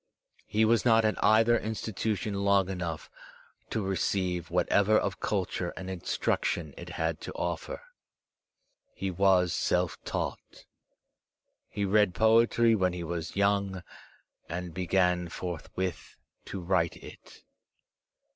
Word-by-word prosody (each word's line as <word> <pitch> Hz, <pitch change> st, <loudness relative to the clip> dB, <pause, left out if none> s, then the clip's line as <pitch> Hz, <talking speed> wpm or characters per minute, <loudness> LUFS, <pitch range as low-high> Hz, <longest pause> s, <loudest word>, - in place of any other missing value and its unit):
He 110 Hz, +1 st, +2 dB
was 115 Hz, +1 st, +3 dB
not 115 Hz, -2 st, +4 dB
at 110 Hz, -, 0 dB
either 115 Hz, +2 st, +5 dB
institution 110 Hz, -1 st, -3 dB
long 100 Hz, -1 st, +2 dB
enough 85 Hz, -4 st, -4 dB, 0.6 s
to 110 Hz, -3 st, -2 dB
receive 95 Hz, -2 st, -1 dB
whatever 105 Hz, +2 st, +3 dB
of 100 Hz, -2 st, -1 dB
culture 95 Hz, -3 st, -2 dB
and 95 Hz, 0 st, -5 dB
instruction 85 Hz, -3 st, -1 dB
it -, -, -9 dB
had 80 Hz, -1 st, -1 dB
to -, -, -6 dB
offer. 85 Hz, -2 st, -4 dB, 1.1 s
He 95 Hz, -1 st, -3 dB
was 90 Hz, -1 st, +3 dB
self 90 Hz, -1 st, 0 dB
taught. -, -, -5 dB, 1.0 s
He 100 Hz, 0 st, -2 dB
read 105 Hz, -1 st, +3 dB
poetry 115 Hz, +1 st, +4 dB
when 95 Hz, -4 st, +1 dB
he 90 Hz, -1 st, -5 dB
was 85 Hz, -1 st, -4 dB
young, 100 Hz, -2 st, +1 dB, 0.7 s
and 85 Hz, 0 st, -5 dB
began 90 Hz, 0 st, +1 dB
forthwith 90 Hz, +1 st, -5 dB, 0.3 s
to 95 Hz, -, -6 dB
write 85 Hz, -2 st, +1 dB
it. -, -, -14 dB
95 Hz, 120 wpm, -29 LUFS, 90-105 Hz, 1.1 s, either